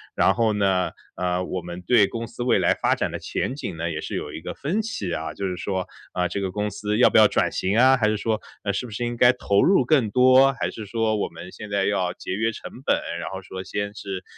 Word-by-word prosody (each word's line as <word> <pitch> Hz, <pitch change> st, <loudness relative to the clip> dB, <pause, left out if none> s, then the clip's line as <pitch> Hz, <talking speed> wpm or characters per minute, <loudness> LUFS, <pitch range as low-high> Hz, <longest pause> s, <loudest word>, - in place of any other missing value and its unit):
然 -, -, +4 dB
后 115 Hz, -2 st, +2 dB
呢， 95 Hz, -3 st, +1 dB, 0.2 s
呃， 90 Hz, 0 st, -1 dB
我 90 Hz, 0 st, -4 dB
们 85 Hz, +1 st, -7 dB
对 105 Hz, +3 st, +4 dB
公 115 Hz, +3 st, -5 dB
司 120 Hz, -, -6 dB
未 125 Hz, -, +3 dB
来 -, -, +3 dB
发 -, -, +1 dB
展 -, -, -1 dB
的 -, -, -4 dB
前 130 Hz, -, -3 dB
景 95 Hz, -, -5 dB
呢 85 Hz, +1 st, -2 dB
也 80 Hz, -1 st, -3 dB
是 -, -, -5 dB
有 -, -, -4 dB
一 -, -, -7 dB
个 -, -, -5 dB
分 170 Hz, +10 st, -2 dB
歧 110 Hz, -, -4 dB
啊， 80 Hz, -1 st, -3 dB
就 100 Hz, -, -3 dB
是 90 Hz, -1 st, -4 dB
说， 95 Hz, -1 st, -3 dB, 0.3 s
呃， 90 Hz, -1 st, 0 dB
这 -, -, -3 dB
个 95 Hz, -2 st, -2 dB
公 105 Hz, +2 st, -2 dB
司 105 Hz, +2 st, -2 dB
要 -, -, +7 dB
不 -, -, +3 dB
要 110 Hz, -1 st, +8 dB
转 -, -, +1 dB
型 95 Hz, +2 st, -1 dB
啊， 130 Hz, +1 st, +6 dB
还 110 Hz, -4 st, +2 dB
是 110 Hz, -, +1 dB
说 110 Hz, 0 st, -1 dB, 0.4 s
是 125 Hz, -, -2 dB
不 120 Hz, -, -10 dB
是 110 Hz, +4 st, -4 dB
应 120 Hz, 0 st, -3 dB
该 120 Hz, +1 st, +7 dB
投 100 Hz, -4 st, +2 dB
入 190 Hz, -7 st, +4 dB
更 125 Hz, -5 st, +2 dB
多， 130 Hz, +3 st, +6 dB
还 130 Hz, -, -2 dB
是 110 Hz, -, -8 dB
说 110 Hz, +1 st, 0 dB
我 105 Hz, -, -1 dB
们 85 Hz, +2 st, -10 dB
现 105 Hz, -, -9 dB
在 100 Hz, -1 st, +1 dB
要 95 Hz, -3 st, 0 dB
节 -, -, -7 dB
约 110 Hz, +3 st, 0 dB
成 -, -, -9 dB
本， -, -, +4 dB, 0.2 s
然 -, -, -5 dB
后 95 Hz, -, -6 dB
说 95 Hz, 0 st, -7 dB
先 100 Hz, +1 st, -3 dB
是， 95 Hz, -2 st, -6 dB
105 Hz, 285 characters per minute, -24 LUFS, 95-120 Hz, 0.4 s, 要